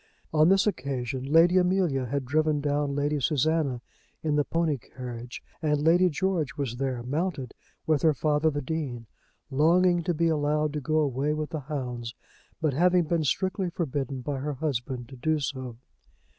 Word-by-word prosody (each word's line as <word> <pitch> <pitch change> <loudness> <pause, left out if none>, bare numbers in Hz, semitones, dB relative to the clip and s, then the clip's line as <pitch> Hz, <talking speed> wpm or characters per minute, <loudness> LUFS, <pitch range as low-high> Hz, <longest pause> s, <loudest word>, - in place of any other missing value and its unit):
On 155 +1 +5
this 195 0 +4
occasion 135 - -2
Lady 170 +3 +6
Amelia 180 -8 +1
had 140 +2 -2
driven 155 +2 +1
down 145 -1 0
Lady 145 +1 0
Susanna 150 -2 +1 0.4
in 155 -2 0
the 145 - +3
pony 160 -3 0
carriage, 120 0 -8 0.2
and 150 -2 +1
Lady 170 +4 +4
George 175 -2 -1
was 130 -4 -3
there, 130 -2 -2
mounted, 140 -1 -2 0.3
with 155 -3 +2
her 155 -2 +4
father 150 +2 +2
the 145 -2 -3
Dean, 130 -6 -4 0.5
longing 175 +5 +4
to 175 0 -1
be 165 +2 +2
allowed 150 -1 +1
to 150 - -3
go 155 +3 0
away 145 +1 0
with 155 0 -4
the 155 - -3
hounds 125 -5 -5 0.4
but 155 -4 +1
having 180 +4 +4
been 165 0 0
strictly 185 +5 0
forbidden 140 -6 -3
by 135 +2 -3
her 145 +2 -3
husband 130 -3 -3
to 135 - -10
do 155 +5 0
so. 130 -4 -4
150 Hz, 170 wpm, -27 LUFS, 130-160 Hz, 0.5 s, Lady